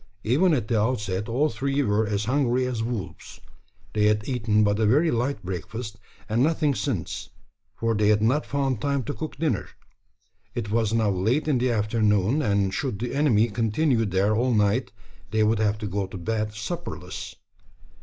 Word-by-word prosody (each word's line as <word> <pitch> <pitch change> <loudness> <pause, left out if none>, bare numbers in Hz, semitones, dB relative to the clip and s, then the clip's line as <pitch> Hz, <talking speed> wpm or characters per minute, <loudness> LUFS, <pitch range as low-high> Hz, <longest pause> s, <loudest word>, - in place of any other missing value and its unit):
Even 150 +11 +3
at 120 -6 -2
the 110 -3 +2
outset 105 -3 -1
all 140 +7 +2
three 140 +4 -1
were 105 -2 +1
as 105 0 -1
hungry 130 0 +1
as 125 -3 -2
wolves. 115 -4 -5 0.5
They 105 -1 +3
had 105 0 +1
eaten 110 -4 +2
but 105 0 +1
a 110 - +3
very 150 +8 +4
light 120 0 -1
breakfast, 105 +4 -5 0.3
and 110 +3 +1
nothing 155 0 +2
since: 120 - -3 0.5
for 115 0 0
they 105 -1 +2
had 105 0 +4
not 130 +7 +2
found 135 -5 -1
time 140 -2 0
to 145 - -4
cook 155 -3 -6
dinner. 145 - -1 0.9
It 110 -4 -3
was 110 -1 +1
now 110 -2 +2
late 110 +12 0
in 140 -5 +2
the 125 +1 +1
afternoon; 105 +3 +2
and 100 -6 +1
should 130 -8 -2
the 120 +4 -4
enemy 120 -6 +3
continue 115 +3 +1
there 100 +3 +1
all 120 +1 +2
night, 105 +3 +1 0.4
they 110 +2 +2
would 110 0 +2
have 105 -1 +1
to 105 - -6
go 100 0 -2
to - - -8
bed 105 +3 -2
supperless. 105 0 -6
110 Hz, 180 wpm, -25 LUFS, 105-130 Hz, 0.9 s, very